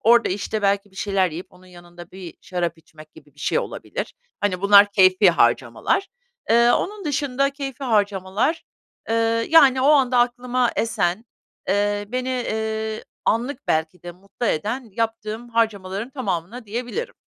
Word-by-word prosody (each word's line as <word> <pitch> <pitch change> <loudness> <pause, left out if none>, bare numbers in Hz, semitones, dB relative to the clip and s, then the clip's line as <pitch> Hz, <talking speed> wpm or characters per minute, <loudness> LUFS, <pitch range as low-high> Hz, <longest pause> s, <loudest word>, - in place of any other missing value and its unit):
orada, 235 +1 +4
işte, 205 +2 -3
belki 200 0 +1
bir 190 - -22
şeyler 195 -3 0
yiyip, 170 +4 -7
onun 185 +1 -19
yanında 175 -1 -14
bir 180 -4 -10
şarap 175 -2 -3
içmek 155 -1 -17
gibi 145 -3 -18
bir 145 - -17
şey - - +1
olabilir. - - -5 0.3
Hani, 185 -3 -1
bunlar 200 0 +6
keyfî 185 -1 +5
harcamalar. 120 - +1 0.4
Iıı, 235 +1 +5
onun 410 -1 -4
dışında, 275 -2 0
keyfî 275 -1 -6
harcamalar, 205 - 0 0.5
ııı, 230 0 +1
yani, 275 -5 +6
o 275 - +3
anda 260 -4 +4
aklıma 245 0 +1
esen, 215 -2 0 0.5
ııı, 205 +2 0
beni, 255 0 -1
iii, 220 0 -3 0.2
anlık 250 +5 -1
belki 160 +3 -1
de 175 0 -8
mutlu 200 +6 -6
eden 220 - -2
yaptığım 225 0 -3
harcamaların 220 -1 -1
tamamına 220 - -4
diyebilirim. 250 - -4
215 Hz, 145 wpm, -22 LUFS, 185-245 Hz, 0.5 s, bunlar